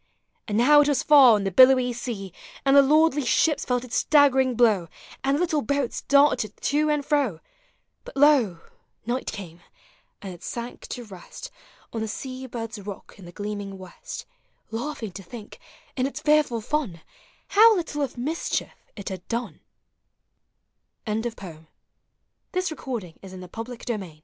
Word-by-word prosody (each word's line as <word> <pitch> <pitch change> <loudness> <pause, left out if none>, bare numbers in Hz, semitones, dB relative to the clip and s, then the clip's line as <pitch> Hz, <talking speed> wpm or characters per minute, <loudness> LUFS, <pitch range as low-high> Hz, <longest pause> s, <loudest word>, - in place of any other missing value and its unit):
And 210 -2 -1
now 290 +5 +6
it 290 - +2
was 290 -2 +1
far 275 -6 +7
on 205 - -1
the 195 - -1
billowy 255 +3 +6
sea; 215 -6 -6 0.3
And 275 0 +4
the 280 - +9
lordly 300 +1 +3
ships 300 +4 +2
felt 245 -1 0
its 250 - -3
staggering 265 -4 +4
blow, 215 -7 +3 0.4
And 275 +1 +2
the - - -1
little 315 -4 +1
boats 280 0 -2
darted 280 -6 +2
to 300 +2 +1
and 295 -2 0
fro: 275 - 0 0.3
— - - -46
But - - -11
lo! 265 - +4 0.4
night 245 +3 -2
came, 175 -4 -9 0.6
and 195 -2 -8
it 175 - -14
sank 240 +1 -7
to 245 - -6
rest 210 - -11 0.4
On 225 - -3
the 220 - -2
sea 260 +4 -6
bird's 230 -3 -6
rock 200 0 -9
iu - - -12
the 175 - -10
gleaming 205 0 -6
west, 190 - -9 0.5
Laughing 230 -2 -4
to 195 - -9
think, 210 +4 -11 0.4
iu 255 0 0
its 280 - -6
fearful 300 -6 +2
fun, 220 - -3 0.5
How 440 +2 +7
little 325 -5 -3
of 270 -3 -3
mischief 300 +7 -2 0.2
it 200 - -6
had 185 -2 -8
done! 235 +1 -4
250 Hz, 145 wpm, -25 LUFS, 210-290 Hz, 0.6 s, the